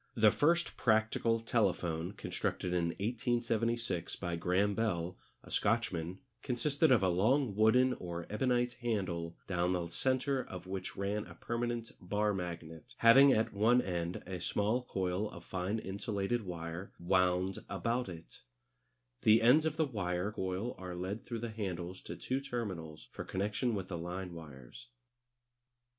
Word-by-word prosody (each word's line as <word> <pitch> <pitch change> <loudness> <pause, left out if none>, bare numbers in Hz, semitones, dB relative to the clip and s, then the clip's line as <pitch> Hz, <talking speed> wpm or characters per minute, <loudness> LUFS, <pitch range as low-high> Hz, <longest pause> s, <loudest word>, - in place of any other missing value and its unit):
The 110 -3 +6
first 170 +7 +2
practical 110 0 +2
telephone, 90 -6 0
constructed 90 -2 -2
in 85 -1 +2
1876 115 -1 -1
by 85 -2 -3
Graham 90 +4 +2
Bell, 90 -5 -1 0.3
a - - -13
Scotchman, 90 -6 0 0.2
consisted 140 +4 +2
of 115 -6 +5
a - - +4
long 110 +6 +2
wooden 125 +4 +5
or 85 -5 -5
ebonite 120 +2 +1
handle 90 -8 -2
down 90 -1 +1
the 85 -2 -2
centre 130 - 0
of 90 -1 -8
which 95 0 -5
ran 100 +1 -1
a 85 - -11
permanent 120 +3 -3
bar 105 +3 +1
magnet, 85 -4 -6
having 135 +4 +8
at 110 -3 +2
one 110 +5 +4
end 85 -5 -2
a 90 -2 -5
small 105 +7 +1
coil 95 0 -1
of - - -11
fine 95 +3 -2
insulated 100 +1 -2
wire 85 +1 -5
wound 90 +1 +1
about 120 -1 -1
it 85 -2 -10 0.8
The 110 +1 +6
ends 150 +7 +6
of 160 - -2
the 160 - +3
wire 95 -6 -2
coil 95 +3 -2
are 90 -1 -6
led 95 +5 -4
through 115 -2 -4
the 115 -1 -3
handles 95 -4 -4
to - - -5
two 130 +2 -2
terminals 95 - -5
for - - -6
connection 105 +5 -1
with 95 -2 -3
the 85 -3 -4
line 90 +1 -5
wires. 80 - -11
100 Hz, 150 wpm, -33 LUFS, 90-115 Hz, 0.8 s, having